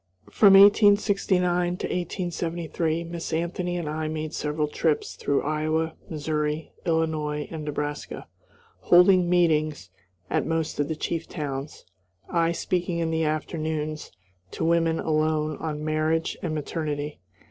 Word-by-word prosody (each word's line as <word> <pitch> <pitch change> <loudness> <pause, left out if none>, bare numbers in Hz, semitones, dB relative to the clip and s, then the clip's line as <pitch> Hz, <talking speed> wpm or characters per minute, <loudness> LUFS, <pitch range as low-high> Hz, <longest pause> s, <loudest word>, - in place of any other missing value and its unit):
From 200 -3 +6
1869 195 -3 +4
to - - -4
1873 170 -2 -2
Miss 170 0 -6
Anthony 175 +2 -2
and 170 -3 -4
I 155 +1 -2
made 155 0 -4
several 150 0 -1
trips 150 +1 -1
through 140 - 0
Iowa, 155 +2 0 0.2
Missouri, 150 0 -2 0.2
Illinois, 155 -2 0
and 160 -2 -5
Nebraska, 145 0 -4 0.5
holding 180 0 +5
meetings 155 - +1 0.4
at - - 0
most 165 -2 -2
of 145 - +1
the 160 - -2
chief 165 +1 -3
towns; 140 -2 -5 0.4
I 165 -1 +1
speaking 175 0 -1
in 165 -1 -1
the 160 0 0
afternoons 155 0 -3 0.4
to - - -2
women 165 -1 +2
alone 155 -1 0
on 155 -1 -4
"Marriage 155 +1 0
and 160 -3 -2
Maternity." 150 -1 -3
160 Hz, 125 wpm, -25 LUFS, 155-170 Hz, 0.5 s, From